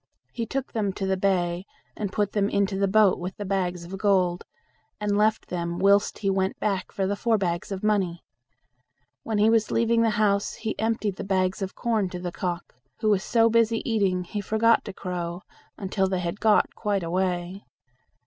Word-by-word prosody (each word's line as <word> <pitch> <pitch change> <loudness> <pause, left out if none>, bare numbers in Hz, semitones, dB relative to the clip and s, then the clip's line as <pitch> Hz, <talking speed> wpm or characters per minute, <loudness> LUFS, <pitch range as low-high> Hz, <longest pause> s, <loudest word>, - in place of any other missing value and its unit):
He 230 -2 -3
took 270 +3 -4
them 205 -4 0
to 195 - -3
the 190 0 +1
bay, 180 -2 0 0.3
and 205 -3 -3
put 205 -1 0
them 205 -1 +1
into 200 0 +1
the 195 +1 +1
boat 205 -1 +4
with 180 +2 -5
the 205 - -5
bags 180 -3 -1
of 190 +3 -7
gold, 185 -3 +2 0.6
and 205 -1 0
left 215 +1 +2
them 170 -1 -3
whilst 200 +2 +3
he 195 - -1
went 190 0 -1
back 195 -3 -1
for 195 - -1
the 200 +2 0
four 225 +1 +1
bags 175 -1 -2
of 195 0 -4
money. 195 -5 0 1.0
When 220 -2 -2
he 210 +1 +4
was 225 -2 +2
leaving 230 0 +2
the 230 - +3
house 205 -1 +1
he 220 -1 -3
emptied 220 -3 -1
the - - -4
bags 190 0 0
of 190 -1 -4
corn 220 -5 0
to 180 - -6
the 175 0 -4
cock, 175 0 -4 0.3
who 215 - +2
was 195 -1 +2
so 230 -1 +3
busy 230 0 +2
eating, 195 -5 +1
he 205 +3 -4
forget 220 +3 +3
to 200 - -6
crow, 180 -1 -5 0.3
until 195 0 0
they 185 -1 -1
had 175 +3 -3
got 215 -1 +3
quite 205 -4 -1
away. 180 +2 -2
195 Hz, 195 wpm, -25 LUFS, 185-215 Hz, 1.0 s, boat